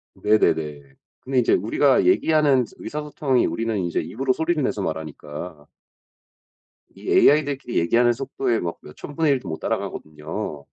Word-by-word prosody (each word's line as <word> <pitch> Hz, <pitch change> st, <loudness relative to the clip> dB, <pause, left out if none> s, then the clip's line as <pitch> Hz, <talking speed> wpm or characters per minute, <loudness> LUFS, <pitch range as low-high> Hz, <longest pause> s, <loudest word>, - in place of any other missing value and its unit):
네네네. 75 Hz, -9 st, 0 dB, 0.3 s
근데 130 Hz, 0 st, -1 dB
이제 120 Hz, -, +3 dB
우리가 130 Hz, +8 st, +3 dB
얘기하는 155 Hz, -, +3 dB
스 -, -, -19 dB
의사소통이 150 Hz, -3 st, -1 dB
우리는 115 Hz, -2 st, -2 dB
인제 85 Hz, -3 st, -1 dB
입으로 130 Hz, +3 st, -1 dB
소리를 160 Hz, +2 st, 0 dB
내서 105 Hz, -, -1 dB
말하니까. 75 Hz, 0 st, -6 dB, 1.3 s
이 -, -, -11 dB
AI들끼리 145 Hz, -4 st, +3 dB
얘기하는 120 Hz, +8 st, +3 dB
속도에 130 Hz, -1 st, -2 dB
막 85 Hz, -1 st, -4 dB
몇 75 Hz, -, -13 dB
1000 145 Hz, -, -9 dB
분의 160 Hz, -3 st, +3 dB
1 135 Hz, -, 0 dB
도 -, -, -10 dB
못 80 Hz, -, -5 dB
따라가거든요. 75 Hz, 0 st, -5 dB
120 Hz, 345 characters per minute, -23 LUFS, -, 1.3 s, 이제